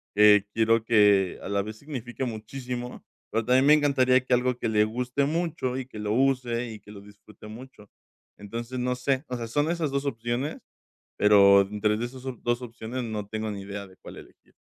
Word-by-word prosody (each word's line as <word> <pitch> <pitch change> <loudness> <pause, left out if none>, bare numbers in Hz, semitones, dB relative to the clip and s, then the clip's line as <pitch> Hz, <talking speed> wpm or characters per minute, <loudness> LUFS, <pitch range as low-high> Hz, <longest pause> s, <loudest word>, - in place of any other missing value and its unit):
eh, 105 -1 +6
quiero 115 0 +2
que 105 -4 +3
a - - -6
la 100 0 0
vez 110 +2 -7
signifique 130 -2 -6
muchísimo, 125 +2 -6 0.3
pero 115 0 -1
también 130 +3 +4
me 150 - +8
encantaría 135 -4 +4
que 130 - 0
algo 125 0 +1
que - - -2
le 105 -1 +3
guste 125 +5 -1
mucho 155 -5 -2
y 130 - -4
que 115 -4 -11
lo 105 0 -2
use 125 -1 0
y 110 - -9
que 105 - -15
lo 105 - -10
disfrute 105 +1 -15
mucho, 110 -1 -12 0.5
entonces, 115 +5 -6
no 125 0 -1
sé, 130 +1 -1
o 125 - -4
sea, 115 - -5
son 145 +7 0
esas 165 -4 -1
2 140 +1 -2
opciones, 120 +4 -3 0.6
pero 100 -1 +6
entre 105 +2 -1
de 115 - -3
esas 130 +1 -8
op 125 -3 -5
2 120 0 0
opciones 120 +1 -6
no 105 -3 -4
tengo 110 +1 -4
ni 100 -1 -6
idea 100 0 -7
de 95 -1 -19
cuál - - -12
elegir. - - -17
120 Hz, 205 wpm, -26 LUFS, 105-130 Hz, 0.6 s, me